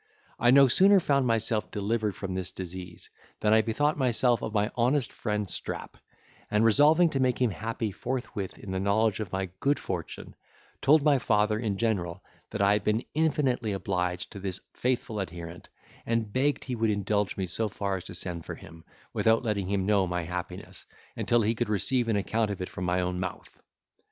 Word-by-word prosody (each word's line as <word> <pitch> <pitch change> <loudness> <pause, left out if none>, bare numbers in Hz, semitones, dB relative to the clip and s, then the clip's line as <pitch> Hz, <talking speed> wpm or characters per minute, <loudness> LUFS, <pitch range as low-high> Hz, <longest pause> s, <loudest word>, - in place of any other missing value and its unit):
I 120 - +4
no 135 +1 +8
sooner 195 +9 +6
found 140 -6 +2
myself 115 -1 0
delivered 105 0 -1
from 95 0 -5
this 95 -1 -3
disease, 90 -1 -8 0.3
than 105 0 +3
I 110 - +6
bethought 145 +8 0
myself 125 -1 +3
of 110 - -3
my 105 -1 +1
honest 125 +3 +1
friend 105 -2 -2
Strap; - - -5 0.5
and 105 +1 +3
resolving 155 +8 +5
to 135 - -1
make 130 -2 +1
him 125 -3 +2
happy 110 +1 -3
forthwith 110 -3 -4
in 95 - -8
the 95 - -1
knowledge 100 +1 +2
of 105 -4 -4
my 95 -1 -2
good 140 +1 +2
fortune, 90 -4 -6 0.5
told 145 +2 +5
my 145 -3 +4
father 105 -1 +2
in 105 -4 -2
general, 95 -7 -1 0.3
that - - -1
I 100 +1 +5
had 105 0 0
been 110 +3 0
infinitely 135 -8 +1
obliged 90 -2 -2
to 100 - -8
this 95 -1 -4
faithful 120 -4 -1
adherent, 85 -1 -7 0.3
and 115 -2 -1
begged 140 +3 +1
he 125 - -3
would 115 -1 +1
indulge 105 0 0
me 95 - -1
so 105 +5 -1
far 100 -1 -2
as 90 - -8
to 95 - -8
send 85 -2 -5
for - - -6
him, 80 +1 -13 0.3
without 115 +1 +3
letting 105 -5 -1
him 100 -2 0
know 100 -2 +3
my 90 -1 -2
happiness, 90 +2 -6 0.3
until 120 -1 +2
he 110 +2 +2
could 115 -1 -2
receive 120 +4 +1
an 115 - +1
account 110 +2 0
of 100 - -4
it 90 - -4
from 90 - -5
my 90 +1 +1
own 90 0 -2
mouth. 95 -1 -6
105 Hz, 195 wpm, -28 LUFS, 95-120 Hz, 0.5 s, no